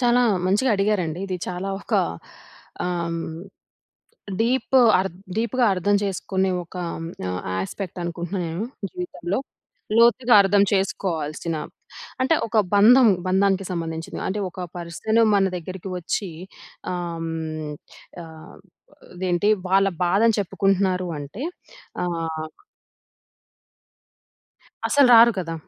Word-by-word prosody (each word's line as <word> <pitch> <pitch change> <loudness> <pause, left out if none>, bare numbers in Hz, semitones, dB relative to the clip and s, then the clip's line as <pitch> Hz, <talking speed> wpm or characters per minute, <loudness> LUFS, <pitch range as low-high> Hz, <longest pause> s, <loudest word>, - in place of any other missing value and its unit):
చాలా 245 +1 +4 0.2
మంచిగా 210 +7 +2
అడిగారండి. 190 -5 0
ఇది 185 - -3
చాలా 180 +2 -4
ఒకా - - +1 0.8
ఆహ్, 170 -2 -2 1.2
డీప్ 255 +4 0 0.2
అర్ద్ 185 -2 -2 0.2
డీపుగా 235 +2 +1
అర్థం 200 +3 +2
చేసుకునే 190 0 -1
ఒకా 180 +2 -7
హ్మ్, 165 0 -6 0.2
ఆహ్, 90 0 -3 0.2
యాస్పెక్టనుకుంటన్నా 175 - -4
నేను. 165 +6 -3 0.3
జీవితంలో 350 - -4 0.6
లోతుగా 240 +1 +5
అర్థం 200 +1 +3
చేసుకోవాల్సిన 170 -5 -1 0.7
అంటే, 265 +5 +3
ఒక 225 0 0 0.2
బంధం, 235 +5 +7 0.2
బంధానికి 195 +1 +2
సంబంధించింది. 165 -2 -4
అంటే, 205 +2 -2
ఒక 185 - -9 0.2
పర్సను 175 +7 0
మన 195 - +4
దగ్గరికి 185 +2 -7
ఒచ్చీ 180 +2 -3 0.6
ఆహ్, 175 -2 -4
హ్మ్, 160 -2 -4 0.5
ఆహ్, 160 -1 -13 0.6
ఇదేంటి 180 +2 +1 0.2
వాళ్ళ 195 +1 +4 0.2
బాధని 205 +6 +3
చెప్పుకుంటున్నారు 190 -1 0
అంటే, 145 - -8 0.6
ఆహ్ 165 -2 -3 2.4
అసలు 285 -2 +5
రారు 235 +1 +8
కదా! 165 -3 -3
185 Hz, 105 wpm, -23 LUFS, 170-205 Hz, 2.4 s, రారు